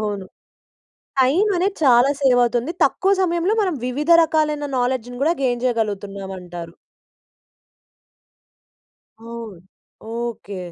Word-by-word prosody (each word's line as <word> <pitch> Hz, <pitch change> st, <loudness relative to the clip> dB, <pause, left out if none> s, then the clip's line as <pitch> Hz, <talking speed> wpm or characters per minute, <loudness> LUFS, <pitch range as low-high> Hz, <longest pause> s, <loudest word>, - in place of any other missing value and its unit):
అవును. 205 Hz, -3 st, -3 dB, 0.9 s
టైం 290 Hz, +11 st, +3 dB
అనేది 385 Hz, +3 st, 0 dB
చాలా 250 Hz, +1 st, +5 dB
సేవ్ 260 Hz, -3 st, +4 dB
అవుతుంది. 240 Hz, +6 st, 0 dB
తక్కువ 390 Hz, +1 st, +1 dB
సమయంలో 350 Hz, +3 st, +1 dB
మనం 370 Hz, -5 st, 0 dB
వివిధ 295 Hz, +6 st, -2 dB
రకాలైన 305 Hz, -2 st, 0 dB
నాలెడ్జ్‌ని 245 Hz, -1 st, -2 dB
కూడా 325 Hz, +3 st, +3 dB
గెయిన్ 245 Hz, -2 st, 0 dB
చేయగలుగుతున్నాం 205 Hz, -5 st, -2 dB
అంటారు. 175 Hz, -2 st, -9 dB, 2.5 s
అవును. 230 Hz, -4 st, -9 dB, 0.6 s
ఓకె. 225 Hz, -5 st, -5 dB
245 Hz, 100 wpm, -21 LUFS, 215-305 Hz, 2.5 s, చాలా